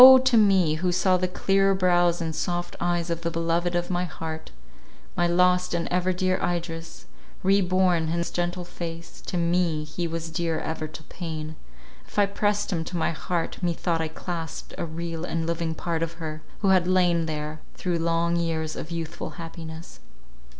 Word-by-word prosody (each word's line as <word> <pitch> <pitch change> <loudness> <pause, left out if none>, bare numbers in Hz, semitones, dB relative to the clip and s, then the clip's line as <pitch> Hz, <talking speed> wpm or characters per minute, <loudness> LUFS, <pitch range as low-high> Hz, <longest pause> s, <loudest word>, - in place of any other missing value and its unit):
to 260 -2 +4
me, 195 -7 +5
who 180 +2 +1
saw 185 +1 +3
the 185 0 +1
clear 195 +1 +3
brows 175 -2 +3
and 160 -1 -2
soft 175 +1 -2
eyes 175 0 0
of 170 0 -2
the 170 - 0
beloved 170 +1 0
of 175 +1 0
my 175 0 +1
heart, 160 -2 -5 0.7
my 175 - +3
lost 180 +1 +3
and 170 - -1
ever 180 +1 +2
dear 185 +1 +1
Idris, 170 -1 -3 0.4
re 195 +1 +5
born 180 -2 +3
in - - -2
his 170 +1 -1
gentle 175 0 -1
face, 170 -1 -7
to 180 - -3
me 170 -2 +2
he 170 +3 -3
was 165 0 -4
dear 165 -1 0
even 155 -1 -4
to 160 - -9
pain; 160 -2 -5 0.5
if - - -15
I 205 - +6
pressed 205 0 0
him 165 -2 0
to 175 - -4
my 165 - +1
heart, 165 +1 -2
methought 170 -1 0
I 160 - 0
clasped 165 0 -5
a - - -3
real 165 0 -4
and 165 -2 -1
living 165 -1 -1
part 165 0 -2
of 165 0 -1
her, 155 -2 -6 0.2
who 200 - +3
had 185 -2 +5
lain 175 -3 +3
there 150 0 -4
through 175 -2 -1
long 170 +1 +1
years 160 -2 -1
of 155 - -6
youthful 165 -1 -5
happiness. 165 0 -8
170 Hz, 185 wpm, -26 LUFS, 165-180 Hz, 0.7 s, I